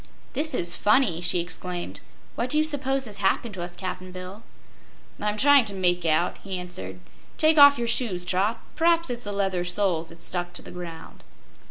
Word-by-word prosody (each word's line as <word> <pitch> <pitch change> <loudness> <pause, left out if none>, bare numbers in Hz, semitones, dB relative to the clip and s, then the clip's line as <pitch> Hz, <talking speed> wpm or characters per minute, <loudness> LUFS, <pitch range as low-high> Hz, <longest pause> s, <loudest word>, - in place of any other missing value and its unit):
"This 300 +1 -1
is 175 -4 0
funny!" 210 -6 +3
she 175 0 +1
exclaimed. 180 0 -5 0.3
"What 245 - -2
do 300 - +1
you 310 - +4
'spose 275 -3 0
has 210 -3 -6
happened 205 +3 0
to 185 - -6
us, 175 0 -6
Cap'n 185 0 -6
Bill?" 185 +3 -8 0.8
"I'm 210 0 -1
tryin' 285 +2 +6
to 200 -2 -4
make 175 -2 +1
out," 160 +2 +1
he 195 -2 -4
answered. 95 - -6 0.4
"Take 310 0 +4
off 285 0 +9
your 235 - -2
shoes, 220 -7 -1
Trot. 195 +5 0 0.2
P'raps 335 -2 +3
it's 240 -1 -4
the 205 - -3
leather 195 -3 0
soles 180 -3 0
that's 170 0 -6
stuck 175 -1 -2
to - - -6
the - - -10
ground." 170 -2 -9
190 Hz, 190 wpm, -25 LUFS, 175-245 Hz, 0.8 s, off